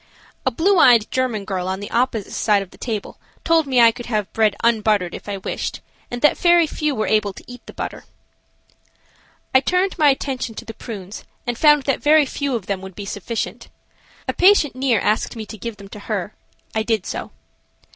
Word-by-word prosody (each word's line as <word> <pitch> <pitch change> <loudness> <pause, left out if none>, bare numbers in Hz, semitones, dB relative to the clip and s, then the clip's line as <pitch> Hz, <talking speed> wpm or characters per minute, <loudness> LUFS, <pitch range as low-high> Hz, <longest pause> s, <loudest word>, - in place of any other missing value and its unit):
A - - +6
blue 345 - +2
eyed 235 -6 +6
German 245 -6 -1
girl 185 -2 -3
on 190 +1 -2
the 205 - -7
opposite 235 -4 0
side 205 -2 +2
of 190 - -16
the - - -16
table 220 -4 -5 0.2
told 325 -2 +3
me 260 -2 +2
I 230 -1 +7
could 240 +1 -9
have 215 -4 -2
bread 215 -2 +2
unbuttered 215 -6 +2
if - - -8
I 200 - -3
wished, 190 - -4 0.3
and 245 0 -6
that 295 - +4
very 345 -1 +5
few 300 -2 -2
were 215 - -1
able 210 -2 +1
to - - -12
eat 245 -1 -11
the - - -10
butter. - - -6 1.5
I 260 - +7
turned 365 +7 0
my 300 - +5
attention 260 -4 -2
to - - -8
the 225 - -7
prunes 205 -4 -8 0.2
and 240 - -2
found 295 +2 +5
that 275 - 0
very 300 0 +5
few 280 -1 -2
of 220 -6 -4
them 195 -1 -3
would 190 -1 -10
be 205 - -7
sufficient. 205 +3 -5 0.6
A - - 0
patient 360 -8 +4
near 255 -4 +2
asked 210 +5 0
me 220 -2 -6
to 220 - -9
give 225 0 -6
them 200 - -11
to 210 - -9
her. 205 -2 -4 0.4
I 220 - 0
did 220 -3 -1
so. - - -5
230 Hz, 205 wpm, -21 LUFS, 205-270 Hz, 1.5 s, I